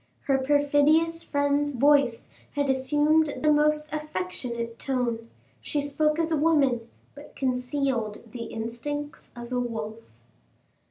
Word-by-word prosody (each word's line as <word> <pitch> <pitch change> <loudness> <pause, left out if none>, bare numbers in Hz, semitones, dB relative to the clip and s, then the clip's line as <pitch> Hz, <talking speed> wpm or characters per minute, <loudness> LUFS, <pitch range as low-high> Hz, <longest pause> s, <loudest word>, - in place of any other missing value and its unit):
Her 270 -1 +1
perfidious 290 +4 +3
friend's 285 -1 +1
voice 275 -2 +3 0.2
had 285 -2 +1
assumed 295 +3 +2
the 305 - +5
most 300 0 +2
affectionate 235 -3 -4
tone; 235 -4 -2 0.3
she 295 - -2
spoke 300 +2 +1
as 330 0 0
a 320 - +2
woman, 275 -7 +2 0.2
but 290 +1 -13
concealed 250 -4 -1
the 235 -1 -6
instincts 240 +7 -5
of 240 0 -8
a 250 - 0
wolf. 225 -2 -4
280 Hz, 120 wpm, -26 LUFS, 240-295 Hz, 0.3 s, the